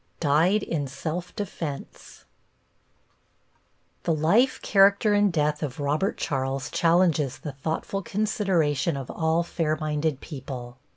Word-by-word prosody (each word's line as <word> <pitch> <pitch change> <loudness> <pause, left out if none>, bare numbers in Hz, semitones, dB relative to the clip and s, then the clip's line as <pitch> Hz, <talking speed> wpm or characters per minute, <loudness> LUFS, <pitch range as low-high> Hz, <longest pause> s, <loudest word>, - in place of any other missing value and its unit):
+DIED 170 +7 +3
IN 145 -4 -2
SELF 160 +6 -5
DEFENSE+ 165 -8 -6 1.8
The 165 - +1
life, 200 - +3
character 200 +1 +4
and 205 -1 +3
death 150 -2 0
of 145 -3 -4
Robert 150 +7 0
Charles 135 0 -2
challenges 165 -5 +2
the 150 - -6
thoughtful 160 +8 -3
consideration 175 -8 0
of 135 -2 -6
all 160 +1 +1
fair 165 -2 -1
minded 150 -2 -1
people. 130 -4 -8
155 Hz, 115 wpm, -26 LUFS, 145-180 Hz, 1.8 s, character